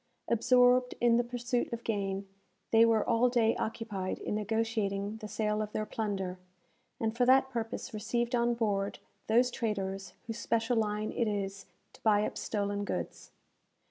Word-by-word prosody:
Absorbed 250 +2 +4
in 235 -1 +4
the 240 - +3
pursuit 245 0 -2
of 235 0 -4
gain, 195 -2 -2 0.4
they 225 0 +7
were 225 -2 +2
all 235 +1 +4
day 230 -2 +3
occupied 210 -4 -3
in - - -4
negotiating 215 -1 -1
the 215 -1 -7
sale 210 0 -1
of 210 0 -4
their 215 - -1
plunder, 195 -5 -3 0.6
and 225 0 -1
for 245 - +2
that 265 +1 +5
purpose 235 +1 -4
received 235 +3 -1
on 240 0 +2
board 205 -4 -1 0.3
those 245 +3 +4
traders 195 -5 -3
whose 225 0 -5
special 230 +1 +1
line 215 -1 0
it 235 - 0
is 195 -1 -3 0.3
to - - -18
buy 210 -1 +4
up - - -4
stolen 205 -1 -2
goods. - - -4
225 Hz, 160 wpm, -31 LUFS, 205-235 Hz, 0.6 s, they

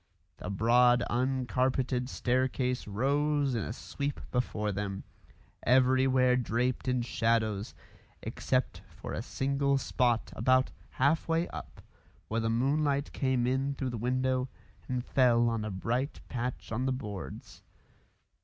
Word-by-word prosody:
The - - -6
broad 120 +4 +4
uncarpeted 130 0 0
staircase 125 -1 0
rose 140 +6 +1
in 115 - 0
a - - -4
sweep 140 +4 -4
before 110 -4 -1
them, 100 0 -4 0.6
everywhere 130 0 +4
draped 125 +2 -1
in 125 -1 +1
shadows, 110 -3 0 0.5
except - - -1
for - - -8
a - - -2
single 140 +1 0
spot 120 -3 0
about 130 +3 +3 0.2
half 140 +5 +1
way 165 +1 +1
up - - -9 0.5
where 115 +1 0
the 115 - 0
moonlight 140 +4 +1
came 130 -3 +1
in 135 +2 0
through 130 -2 -3
the 120 - -4
window 130 +2 0 0.4
and 125 -1 -2
fell 120 -3 +4
on 115 -2 -1
a 110 - -3
bright 120 +8 -2
patch 125 -1 -4
on 125 +4 -1
the - - +2
boards. 105 - -6
125 Hz, 130 wpm, -30 LUFS, 115-130 Hz, 0.6 s, broad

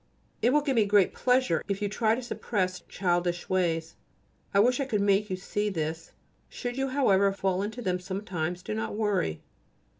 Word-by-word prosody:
It 245 - +4
will 295 +2 +4
give 275 -3 0
me 220 -2 +4
great 200 -2 +4
pleasure 250 -10 +2
if 200 -1 -1
you 205 - 0
try 220 +2 +1
to 255 - -5
suppress 185 -6 -2
childish 175 -1 -1
ways. 165 -3 0 0.6
I 200 - +3
wish 245 +5 +4
I 275 - 0
could 220 -6 0
make 200 +1 +2
you 185 - -1
see 205 +3 -2
this. 160 -3 -4 0.4
Should 245 -1 -5
you, 270 +1 0
however, 200 -8 +3
fall 190 -1 -1
into 220 +4 -4
them 180 -2 0
sometimes, 180 -2 -4
do 105 - -4
not 110 - -3
worry. 205 - 0
200 Hz, 185 wpm, -28 LUFS, 180-220 Hz, 0.6 s, It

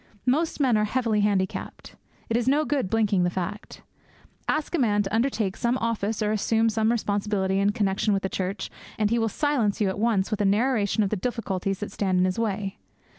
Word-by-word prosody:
Most 310 +7 +1
men 255 -6 +3
are 210 - +2
heavily 225 -1 0
handicapped; 200 -2 -1 0.3
it 225 - -1
is 240 0 0
no 295 +3 +3
good 275 -11 0
blinking 210 -3 +2
the 175 - +2
fact. 185 +3 -5 0.6
Ask 305 +2 -1
a 340 - +1
man 205 -5 +2
to 195 +1 -5
undertake 225 -5 0
some 240 +2 0
office 225 -2 -1
or 210 - +1
assume 225 +1 +2
some 220 +1 +1
responsibility 205 -3 0
in 200 +1 +3
connexion 205 -1 0
with 195 -1 0
the - - +1
church, 190 +1 -3 0.3
and 210 -1 +1
he 235 - +2
will 225 0 +1
silence 245 -5 0
you 205 -3 +2
at 190 - -4
once 220 -3 +1
with 215 -1 -1
a - - +3
narration 215 0 +2
of 195 - -1
the - - +1
difficulties 195 -4 -2
that 205 - -4
stand 190 -2 0
in 180 - +4
his 185 +3 -1
way. 205 -2 -2
210 Hz, 210 wpm, -25 LUFS, 195-230 Hz, 0.6 s, in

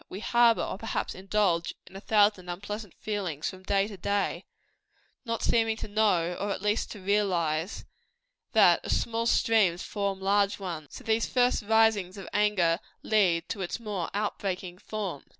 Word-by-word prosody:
We 190 - -6
harbor 235 +1 +4
or 190 - -4
perhaps 225 - -3
indulge 190 -3 0 0.2
a 190 - -8
thousand 205 -4 +2
unpleasant 205 +2 -6
feelings 185 -8 -3
from 185 -1 -6
day 195 +1 +1
to 205 -2 -9
day, 200 +3 -1 0.8
not 230 -1 -3
seeming 225 -1 +2
to - - -6
know, 205 -5 +2
or 205 - -2
at 195 - -3
least 210 +2 0
to 210 - -10
realize, 185 -4 0 0.7
that - - +5
as - - +1
small 230 0 -2
streams 205 -8 +3
form 200 -2 -2
larger 200 +1 +1
ones, 165 -5 -5
so - - -9
these 225 0 +1
first 250 -1 +2
risings 210 -3 +2
of 195 - -8
anger 195 -5 +2 0.2
lead 180 -7 +2
to 205 - -4
its 180 +4 -3
more 205 -6 -4
out 210 0 -1
breaking 185 -2 -4
forms. 200 -11 -5
200 Hz, 165 wpm, -28 LUFS, 185-215 Hz, 0.8 s, that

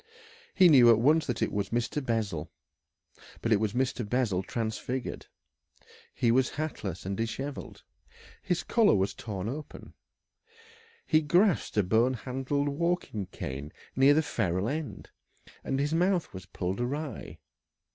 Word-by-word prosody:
He 185 - +7
knew 130 -7 +7
at 115 - +7
once 150 +7 +3
that 125 -4 -1
it - - -1
was 100 -1 -2
Mr. 120 +5 -1
Bessel. 105 - -2 0.9
But 115 - -2
it 105 - +5
was 105 -1 -1
Mr. 130 -1 0
Bessel 105 -4 0
transfigured. 115 +4 -4 0.9
He 120 - +2
was 130 +2 +3
hatless 110 - -5
and 95 +1 -2
dishevelled, 125 +6 -5 0.6
his 175 -1 -1
collar 225 - +4
was 95 0 0
torn 100 -3 -5
open, 145 +5 -7 1.1
he 155 -1 +3
grasped 175 - +2
a 105 - +5
bone 115 +7 +2
handled 135 +4 -2
walking 160 - -1
cane 70 +3 -6 0.2
near 135 +2 +6
the 160 - +3
ferrule 95 - -1
end, 145 -8 -5 0.5
and 135 - -1
his 145 +2 0
mouth 180 +1 +1
was 95 -1 -9
pulled 95 +4 -3
awry. 140 +2 -4
125 Hz, 140 wpm, -29 LUFS, 105-145 Hz, 1.1 s, He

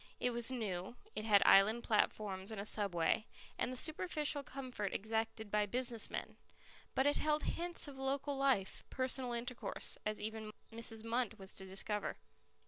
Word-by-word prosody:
It 250 - +1
was 240 0 +2
new, 210 -5 -3 0.2
it 215 - -3
had 205 -3 +6
island 215 +4 +6
platforms 205 -3 +1
and 220 -2 -4
a 200 - -3
subway, 200 0 +1 0.3
and 250 - 0
the 255 - -3
superficial 305 -1 +2
comfort 255 -7 -4
exacted 220 0 -2
by 210 -1 +2
business 240 +1 0
men. - - -5 0.6
But 265 - +3
it 290 - +4
held 300 0 +1
hints 345 -2 -1
of 275 -2 -9
local 275 +1 -1
life, 265 -8 +1
personal 255 -1 +1
intercourse, 240 +1 -2
as 215 0 -2
even 220 0 -5 0.2
Mrs. 225 -1 -1
Munt 230 -1 -1
was 195 -2 -7
to 190 - -6
discover. 205 +2 0
225 Hz, 160 wpm, -37 LUFS, 210-265 Hz, 0.6 s, had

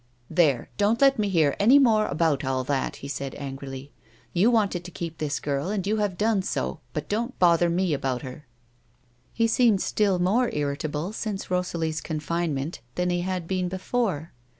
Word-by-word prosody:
"There, 155 -7 +2
don't 210 +3 +2
let 275 -3 +5
me 205 -1 +1
hear 160 -6 +3
any 240 +7 +7
more 225 -6 +4
about 150 -1 +1
all 130 -1 -1
that," 135 0 -1
he - - -4
said, 140 -1 -4
angrily. 135 0 -7 0.2
" - - -31
Yon 195 +7 +4
wanted 200 -6 +1
to 180 - -8
keep 170 -2 -6
this 145 -2 -1
girl, 145 +4 -2
and 200 -3 -2
you 215 +2 +1
have 205 -4 -1
done 215 -2 +2
so, 65 - -3
but 150 +1 -4
don't 235 +4 -2
bother 170 -1 +4
me 175 -1 +1
about 135 -2 -2
her." 135 +3 -9 0.8
He 230 - +1
seemed 225 -2 +4
still 200 -1 +1
more 210 +8 +2
irritable 150 +5 -2
since 205 -4 -4
Rosalie's 165 -3 -1
confinement 155 -2 -2 0.2
than 180 0 0
he 175 0 0
had 180 -2 -3
been 185 -1 -1
before. 185 - -2
175 Hz, 180 wpm, -26 LUFS, 145-205 Hz, 0.8 s, any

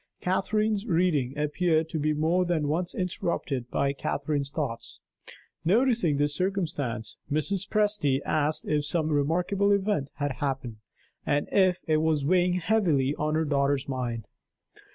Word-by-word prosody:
Catherine's 210 +3 0
reading 160 - +1
appeared 160 +2 +1
to 160 - -3
be 155 +1 +1
more 160 +4 +2
than 170 -4 0
once 170 +4 -1
interrupted 170 -8 -2
by 140 +2 0
Catherine's 140 0 -2
thoughts. 140 -6 -5 0.6
Noticing 210 - +3
this 145 0 +1
circumstance, 150 - -2
Mrs. 180 +6 0
Presty 205 -11 +1
asked 155 0 0
if 150 -1 +1
some 155 +1 0
remarkable 175 +7 +1
event 195 -8 +1
had 140 -3 -3
happened, 135 -5 -2 0.5
and 145 0 0
if 185 -2 +3
it 155 -1 +2
was 155 -2 +1
weighing 180 +2 +3
heavily 170 -8 +2
on 155 +1 0
her 160 0 +1
daughter's 140 -1 +1
mind. 120 -4 -3
155 Hz, 135 wpm, -27 LUFS, 140-180 Hz, 0.6 s, Noticing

